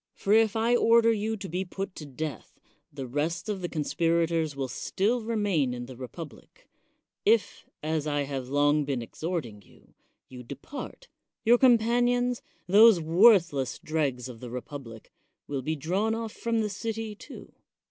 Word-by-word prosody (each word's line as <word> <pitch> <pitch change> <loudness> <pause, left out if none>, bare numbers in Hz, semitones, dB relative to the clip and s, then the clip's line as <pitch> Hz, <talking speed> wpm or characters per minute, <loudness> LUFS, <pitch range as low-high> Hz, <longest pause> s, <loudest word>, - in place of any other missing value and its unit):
For 200 - 0
if 220 -1 +4
I 230 +2 +2
order 230 -1 +5
you 220 +1 -2
to 195 - -7
be 180 +3 -2
put 195 +1 -6
to 150 - -8
death, 145 +2 -7 0.3
the 140 -2 -6
rest 150 - -2
of 205 -3 -3
the 175 - -3
conspirators 165 0 0
will 135 -1 -2
still 205 - -1
remain 205 - 0
in 120 0 -6
the 130 0 -10
republic; 155 - -10 0.6
if, 445 +3 +1 0.2
as 155 -1 -1
I 145 -1 0
have 135 -2 -5
long 145 +2 +3
been 135 -4 -2
ex 115 - -15
horting 155 - -4
you, - - -23 0.3
you 125 -1 -10
depart, 140 - -9 0.4
your 240 +2 +6
companions, 245 0 +3 0.2
those 210 +1 +7
worthless 165 - +4
dregs 140 -6 -2
of 120 -3 -10
the 125 - -8
republic, 125 -2 -8 0.3
will 140 -2 -3
be 155 +5 -2
drawn 190 +9 0
off 225 -1 -4
from 230 -1 -1
the 210 - -1
city, 225 +1 -4
too. 210 - -12
170 Hz, 160 wpm, -28 LUFS, 140-220 Hz, 0.6 s, those